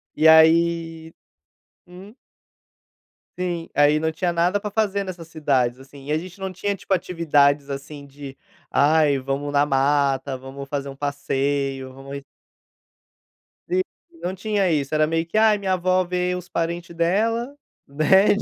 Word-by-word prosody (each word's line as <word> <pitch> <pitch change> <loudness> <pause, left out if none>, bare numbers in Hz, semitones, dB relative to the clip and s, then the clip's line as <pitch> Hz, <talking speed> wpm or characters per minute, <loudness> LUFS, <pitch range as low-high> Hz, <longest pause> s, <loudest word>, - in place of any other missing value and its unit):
E 160 - +4
aí 165 0 +4 0.7
hum? 190 +5 -13 1.3
Sim. 175 -2 -3
Aí, 145 +1 +4
não 160 0 0
tinha 175 +1 -1
nada 175 +4 +1
pra 210 - -5
fazer 200 -2 0
nessas 175 -3 -8
cidades, 130 -5 0
assim, 135 +1 -14
e - - -3
a 155 - +2
gente 180 +3 -8
não 190 -1 -4
tinha 200 +2 -2
tipo 195 - -3
atividades, 145 -5 +2
assim, 140 +1 -7
de 140 -1 -11 0.3
ai 145 -1 +3
vamos 140 +2 -3
na 145 +1 +4
mata, 135 -1 +1
vamos 135 +1 -9
fazer 140 -1 -4
um 135 - -9
passeio, 140 -2 -2
vamos 135 +1 -8 1.5
Si 370 +1 +2 0.4
não 185 +2 -3
tinha 200 -1 0
isso, 145 -1 -1
era 155 0 +3
meio 165 +1 0
que 190 +6 -3
ai, 215 -1 +5
minha 190 -2 -1
avó 185 0 +2
vê 180 0 -1
os 180 -1 -7
parente 170 +1 -3
dela, 225 +10 0 0.3
né. 155 +8 +4
160 Hz, 150 wpm, -22 LUFS, 140-180 Hz, 1.5 s, ai